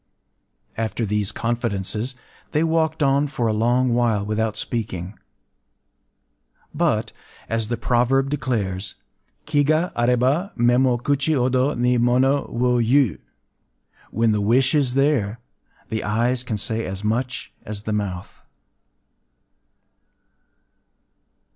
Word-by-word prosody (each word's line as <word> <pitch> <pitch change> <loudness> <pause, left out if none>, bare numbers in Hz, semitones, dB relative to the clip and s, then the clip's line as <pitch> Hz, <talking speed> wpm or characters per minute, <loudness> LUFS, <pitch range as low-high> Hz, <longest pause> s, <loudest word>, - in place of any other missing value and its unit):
After 115 +1 -2
these 105 -1 0
confidences, 115 0 -2 0.4
they 155 - +2
walked 160 -1 +1
on 140 +1 +3
for 135 -4 -2
a 110 - +1
long 120 +3 +2
while 115 -4 +1
without 110 0 -1
speaking; 95 -5 -4 1.6
but, - - 0 0.4
as 115 -1 -1
the 120 +1 -2
proverb 130 +4 +1
declares, 100 -9 -2 0.5
Ki 145 -2 +2
ga 155 +4 +1
aréba, 125 - +1
mé 120 +1 +4
mo 125 -2 +3
kuchi 140 +5 0
hodo 130 +2 +1
ni 125 0 +2
mono 130 +4 +2
wo 125 +1 +1
iu: 120 - +2 0.9
“When 115 +1 +1
the 105 -1 +1
wish 125 +6 +3
is 135 -4 +2
there, 130 -6 +1 0.5
the 110 -1 -2
eyes 120 +4 0
can 115 -4 -3
say 110 +2 -1
as 95 0 -5
much 120 +3 -2
as 105 -1 -7
the 110 - -2
mouth. 95 -4 -4
120 Hz, 115 wpm, -22 LUFS, 110-135 Hz, 1.6 s, mé